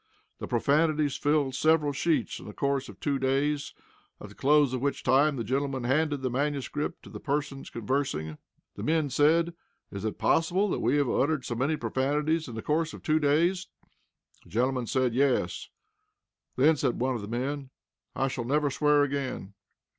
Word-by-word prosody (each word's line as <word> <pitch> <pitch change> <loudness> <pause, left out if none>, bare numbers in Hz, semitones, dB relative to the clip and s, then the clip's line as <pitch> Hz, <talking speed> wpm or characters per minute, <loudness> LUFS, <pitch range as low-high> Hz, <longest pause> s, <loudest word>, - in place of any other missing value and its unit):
The - - -5
profanities 150 +3 +2
filled 145 -2 +1
several 155 +1 +3
sheets 145 -3 0
in - - -11
the 105 - -8
course 140 -1 -1
of - - -12
two 140 -2 -1
days, 140 +2 0 0.4
at - - -9
the - - -13
close 145 -1 +3
of 130 - -2
which 140 0 -1
time 140 +4 +3
the 120 - -3
gentleman 135 +1 -1
handed 145 +2 0
the 130 - 0
manuscript 145 +2 -2
to - - -12
the - - -7
persons 145 -1 -3
conversing. 105 - -2 0.3
The - - -8
men 155 -2 +1
said: 165 +5 +3 0.4
"Is 100 -1 -6
it 110 - -3
possible 185 +5 +2
that - - -1
we 145 - +2
have 145 -2 +2
uttered 140 +2 0
so - - -3
many 135 +6 0
profanities 145 +7 0
in 120 - -8
the 110 - -5
course 160 +1 0
of - - -13
two 155 -1 +2
days?" 170 +6 +2 0.8
The - - -19
gentleman 125 +2 0
said: 130 -1 +1
"Yes." 135 0 0 0.9
"Then," 150 +5 +4
said 130 -3 0
one 130 +2 +1
of 120 - -4
the 100 - -7
men, 135 +4 -3 0.5
"I 135 - +1
shall 130 -2 -3
never 145 +2 +1
swear 150 +1 +3
again." 135 -8 -3
140 Hz, 180 wpm, -28 LUFS, 130-150 Hz, 0.9 s, Then